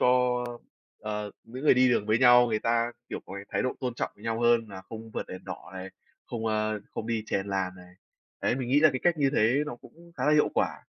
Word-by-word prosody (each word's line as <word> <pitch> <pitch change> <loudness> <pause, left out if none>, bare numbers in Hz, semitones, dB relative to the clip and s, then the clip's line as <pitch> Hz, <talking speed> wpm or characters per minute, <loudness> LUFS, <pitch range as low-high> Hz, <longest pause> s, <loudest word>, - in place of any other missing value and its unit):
cho, 125 -1 +3 0.6
ờ, 105 -1 -4
những 125 +5 -8
người 150 - +7
đi 130 0 +5
đường 120 -4 +2
với 110 +1 +3
nhau 125 -1 +7
người 110 - +1
ta, 115 +1 +1 0.2
kiểu, - - -5
có 95 - -8
cái 100 0 -7
thái - - 0
độ 130 - 0
tôn 125 -3 -2
trọng - - -2
nhau 115 +2 -3
hơn 120 -1 +4
là 95 -2 -8
không 115 0 -8
vượt - - -4
đèn 95 - -8
đỏ - - -8
này, 95 0 -6 0.4
không, 115 -1 -4
ơ, 110 -1 0
không 110 - -4
đi 115 -2 -1
chèn 100 -2 -1
làn 95 -2 -1
này. 90 0 -15 0.5
Đấy, - - +2
mình 130 -2 -3
nghĩ 140 +3 +4
là 155 0 +7
cái 130 - -3
cách 175 -2 +3
như 140 -2 +3
thế 110 +4 +4
nó 120 - -5
cũng 170 +7 -17
khá - - -1
là 150 - +5
hiệu 150 0 +4
quả. - - -1
115 Hz, 250 wpm, -28 LUFS, 110-125 Hz, 0.6 s, người